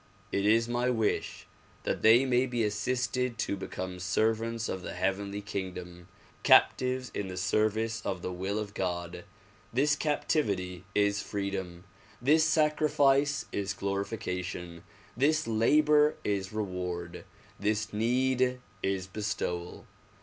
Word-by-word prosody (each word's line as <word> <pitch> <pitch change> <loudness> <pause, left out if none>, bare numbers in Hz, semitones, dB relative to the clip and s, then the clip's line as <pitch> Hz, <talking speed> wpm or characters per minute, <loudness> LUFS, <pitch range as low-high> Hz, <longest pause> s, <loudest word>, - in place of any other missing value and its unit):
It 100 +1 +1
is 115 +2 +4
my 120 +1 0
wish 110 -4 -1 0.4
that - - -2
they 115 +4 +6
may 125 0 +2
be 120 -2 -1
assisted 125 +3 -1
to 110 - -1
become 95 -1 -6
servants 110 +5 0
of 95 - -3
the - - -6
heavenly 100 +2 -1
kingdom, 90 -3 -6 0.3
captives 130 0 +4
in 100 - -3
the 90 -1 -6
service 110 +3 0
of 95 -2 -3
the 90 - -3
will 95 +3 -2
of 105 -1 -4
God. 90 -1 -3 0.5
This 145 +5 +3
captivity 100 - -1
is 100 0 +2
freedom, 95 -3 -4 0.4
this 150 +6 +4
sacrifice 145 -3 +3
is 100 -1 -2
glorification, 90 -4 -4 0.3
this 155 +5 +2
labor 150 +7 +4
is 100 -2 -1
reward, 90 -4 -4 0.4
this 105 +1 -1
need 125 +3 +1 0.2
is 95 -1 -1
bestowal. 95 -3 -4
105 Hz, 120 wpm, -30 LUFS, 95-125 Hz, 0.5 s, they